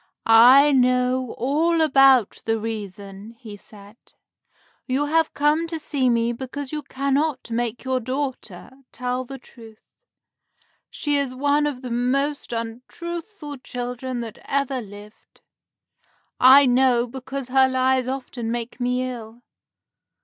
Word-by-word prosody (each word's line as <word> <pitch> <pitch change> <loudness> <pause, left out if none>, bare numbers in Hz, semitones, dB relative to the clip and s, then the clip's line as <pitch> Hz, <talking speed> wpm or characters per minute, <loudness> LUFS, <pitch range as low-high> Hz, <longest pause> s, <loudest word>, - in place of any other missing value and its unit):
"I 250 +6 +7
know 255 -1 +1
all 315 +7 +1
about 270 -7 +4
the 225 0 +1
reason," 205 -1 -7
he 215 -4 -10
said. 205 +1 -15 0.9
"You 270 +3 0
have 320 +2 +1
come 300 +3 +1
to 330 0 -4
see 280 -4 -1
me 235 0 +1
because 265 +3 -7
you 305 -1 -3
cannot 280 -1 -2
make 235 0 -2
your 260 -1 -1
daughter 255 -7 -5 0.2
tell 250 +1 -3
the 270 +2 -8
truth. 225 - -18 0.9
She 290 -1 -1
is 275 -2 -2
one 290 +2 +1
of 265 -3 -5
the 250 - -6
most 275 +5 -1
untruthful 290 - -7
children 250 0 -5
that 225 -2 -8
ever 275 -2 -1
lived. 205 0 -15 1.0
I 270 +2 +8
know, 250 -1 +3
because 265 +1 -7
her 265 0 +4
lies 260 0 +1
often 255 -3 -5
make 235 +1 -5
me 250 +1 -1
ill. 235 -1 -9
255 Hz, 130 wpm, -22 LUFS, 235-275 Hz, 1.0 s, I